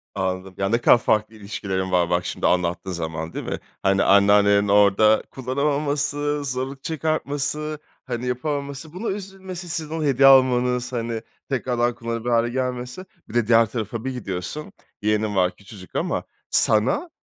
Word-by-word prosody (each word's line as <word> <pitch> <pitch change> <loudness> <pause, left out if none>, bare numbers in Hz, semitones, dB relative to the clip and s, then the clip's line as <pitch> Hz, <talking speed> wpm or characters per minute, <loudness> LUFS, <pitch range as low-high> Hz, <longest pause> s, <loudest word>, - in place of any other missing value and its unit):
Anladım. 95 -1 -3
Ya 100 0 0
ne 115 - +3
kadar - - +7
farklı 110 -1 0
ilişkilerin 95 -3 -4
var 90 -2 +2
bak 90 0 +1
şimdi - - -1
anlattığın 90 +1 0
zaman. 80 -2 -4
Değil - - -5
mi? - - -3 0.2
Hani 95 0 +3
anneannelerin 100 0 +5
orada 105 +2 +5
kullanamaması, 145 +2 -1
zorluk 135 +1 -4
çıkartması, 150 -1 -2 0.3
hani 125 -1 -4
yapamaması, 140 +3 -3
buna 200 +6 -5
üzülmesi, 190 -2 -6
sizin 160 -2 -3
ona 160 - -2
hediye 135 -1 +5
almanız, 125 -2 +4
hani, 115 -1 -2 0.3
tekrardan 120 -2 0
kullanılabilir 115 0 -4
hâle 115 0 +3
gelmesi. 125 +5 -3 0.2
Bir - - -11
de 120 -2 +1
diğer 115 0 +6
tarafa 115 +1 -5
bir 130 - -1
gidiyorsun. 125 +4 -5 0.3
Yeğenin 105 0 0
var 90 -1 +2
küçücük 100 -2 -14
ama - - -1 0.3
sana 125 - +2
120 Hz, 150 wpm, -23 LUFS, 100-140 Hz, 0.3 s, kadar